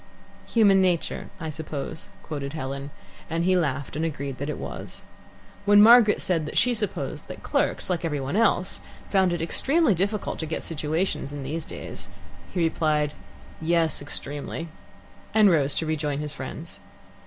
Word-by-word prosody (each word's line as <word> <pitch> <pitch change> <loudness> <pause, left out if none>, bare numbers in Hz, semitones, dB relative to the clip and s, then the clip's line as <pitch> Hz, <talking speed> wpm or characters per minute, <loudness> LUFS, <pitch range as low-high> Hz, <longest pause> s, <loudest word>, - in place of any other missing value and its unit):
"'Human 200 -4 +5
nature,' 180 -3 0
I 160 -2 -4
suppose," 155 0 -6
quoted 140 -2 -5
Helen, 140 -2 -4 0.4
and 165 +1 0
he 185 +1 +3
laughed 145 -6 -1
and 155 - -1
agreed 140 -5 -3
that 140 +2 -3
it 150 - -3
was. - - -7 0.6
When 205 0 +7
Margaret 225 0 +7
said 165 -4 0
that - - -4
she 250 - +4
supposed 210 -3 -3
that - - -9
clerks, - - 0
like 180 -2 -1
every 150 -3 -1
one 135 +6 -3
else, 200 -4 +2 0.3
found 190 -2 +4
it 170 -1 -1
extremely 275 - +3
difficult 200 +3 -1
to 160 - -3
get 160 - -3
situations 155 -1 -1
in 145 -1 -5
these 155 +4 -3
days, - - -7 0.4
he 175 - -1
replied, 155 -2 +1 0.5
"Yes, 165 -2 +2
extremely," 145 +3 -5 0.7
and 210 -3 +7
rose 145 -4 +2
to 165 - -1
rejoin 150 -2 -1
his 150 0 -4
friends. - - -7
160 Hz, 160 wpm, -26 LUFS, 145-185 Hz, 0.7 s, When